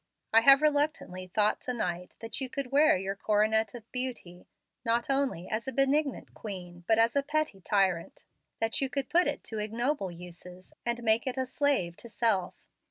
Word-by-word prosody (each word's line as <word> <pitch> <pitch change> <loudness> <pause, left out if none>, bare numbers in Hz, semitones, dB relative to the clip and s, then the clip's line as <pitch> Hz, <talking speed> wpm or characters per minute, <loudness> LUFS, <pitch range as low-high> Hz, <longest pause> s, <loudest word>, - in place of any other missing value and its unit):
I 225 - +8
have 275 +4 +7
reluctantly 290 - 0
thought 210 +3 +1
to 250 - -3
night 180 -5 -3
that 225 +4 -5
you 260 - -3
could 270 0 -4
wear 295 -3 +5
your 195 +1 -3
coronet 215 +2 +1
of 230 -1 -12
beauty, 245 -9 -4 0.4
not 235 +3 +1
Only 270 -10 0
as 225 +4 -3
a - - 0
benignant 275 +2 +1
queen, 180 -4 -8
but 225 - +4
as 230 +2 +3
a 280 - +4
petty 300 -8 -2
tyrant, 185 -3 0 0.3
that 225 +3 -1
you 270 - 0
could 275 -1 -3
put 350 0 +4
it 285 - -3
to 220 - -5
ignoble 230 +1 -1
uses, 180 +1 -9
and 235 0 -1
make 225 +2 +2
it 260 - -2
a 260 - 0
slave 260 - 0
to 235 - -11
self. 220 -5 0
230 Hz, 185 wpm, -29 LUFS, 195-270 Hz, 0.4 s, I